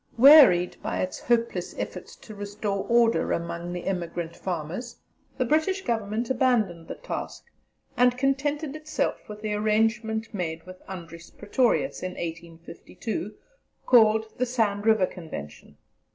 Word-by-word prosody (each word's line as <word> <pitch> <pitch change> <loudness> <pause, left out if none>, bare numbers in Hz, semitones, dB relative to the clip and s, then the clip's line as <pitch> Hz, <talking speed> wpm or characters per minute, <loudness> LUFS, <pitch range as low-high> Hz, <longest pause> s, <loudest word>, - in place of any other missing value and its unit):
Wearied 255 - +8
by - - -3
its 185 - -4
hopeless 230 -7 -1
efforts - - -6
to 215 - -12
restore 205 -1 -4
order 235 -1 +3
among 170 +1 -3
the 175 0 -5
emigrant 170 -3 -3
farmers, 185 +7 -5 0.4
the 255 - +1
British 315 +8 +1
Government 225 - -2
abandoned 225 -10 +1
the - - -6
task, - - -6 0.5
and 250 0 +3
contented 280 +2 -1
itself 310 -6 -3
with 210 0 -9
the 215 -1 -1
arrangement 220 +1 0
made 165 -4 -4
with 185 0 -12
Andries 170 -3 -9
Pretorius, 245 +5 0
in 185 0 -4
1852, 170 +6 -6 0.5
called 220 -2 +5
the 255 - +2
Sand 220 -4 0
River 220 -4 +5
Convention. 155 - -9
215 Hz, 130 wpm, -26 LUFS, 180-240 Hz, 0.5 s, Wearied